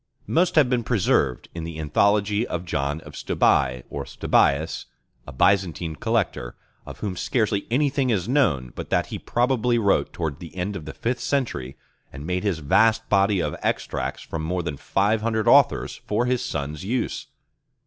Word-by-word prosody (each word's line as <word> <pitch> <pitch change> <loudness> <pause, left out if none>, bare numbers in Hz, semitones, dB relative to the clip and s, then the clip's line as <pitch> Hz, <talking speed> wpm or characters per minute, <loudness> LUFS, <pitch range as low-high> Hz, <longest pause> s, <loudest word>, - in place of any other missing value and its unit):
Most 175 +2 +1
have 150 -5 +6
been 125 -1 0
preserved 90 - +1
in 85 - -5
the 80 -1 -6
Anthology 100 +7 +2
of 90 0 -4
John 75 -1 -2
of - - -12
Stobi 65 -2 +1
(Stobæus), 75 +4 +1 0.4
a - - -7
Byzantine 85 +1 +1
collector, - - -1 0.3
of - - -10
whom 100 -3 -3
scarcely 100 +4 0
anything 135 +1 +1
is 100 -5 0
known 80 - +1
but - - -7
that - - +2
he - - -3
probably 120 -1 +1
wrote 100 -4 +2
towards 80 -4 -4
the 85 0 -10
end 95 +3 -3
of 80 - -6
the 80 - -8
fifth 125 +2 -2
century, 115 - -2 0.3
and 70 +3 -8
made 90 +1 -1
his 100 -6 0
vast 115 +7 +3
body 100 -1 +3
of - - -2
extracts - - -2
from 80 - -5
more 90 +3 -2
than 80 -3 -3
five 105 +8 +1
hundred 110 -1 -1
authors - - +4
for 110 +4 +1
his 125 0 0
son's 75 - -4
use. 120 +5 -2
100 Hz, 170 wpm, -24 LUFS, 80-115 Hz, 0.4 s, have